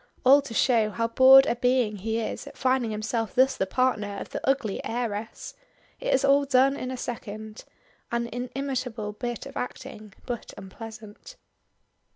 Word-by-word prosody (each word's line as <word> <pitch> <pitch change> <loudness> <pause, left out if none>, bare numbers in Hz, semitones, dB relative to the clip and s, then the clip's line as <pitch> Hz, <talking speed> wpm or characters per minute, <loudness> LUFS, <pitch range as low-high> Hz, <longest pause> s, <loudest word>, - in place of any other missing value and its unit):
All 275 +3 +7
to 275 -4 -9
show 225 -4 +3
now 230 +2 -1
bored 265 +3 +8
a - - 0
being 245 -3 +1
he 220 +3 -2
is 225 - -4
at - - -12
finding 255 -3 +1
himself 220 0 -3
thus 265 +1 +4
the 190 - -1
partner 210 -3 0
of - - -7
the - - -4
ugly 250 -7 -1
heiress! 225 -2 -4 0.5
It - - -2
is 270 - +3
all 280 +1 +4
done 270 0 +3
in 255 -3 -5
a 260 - -4
second. 215 -3 -7 0.5
An 235 0 0
inimitable 250 -3 -4
bit 240 +2 -5
of 275 - -10
acting 215 -5 -7
but 240 -2 -6
unpleasant. 215 +2 -11
240 Hz, 165 wpm, -26 LUFS, 215-260 Hz, 0.5 s, bored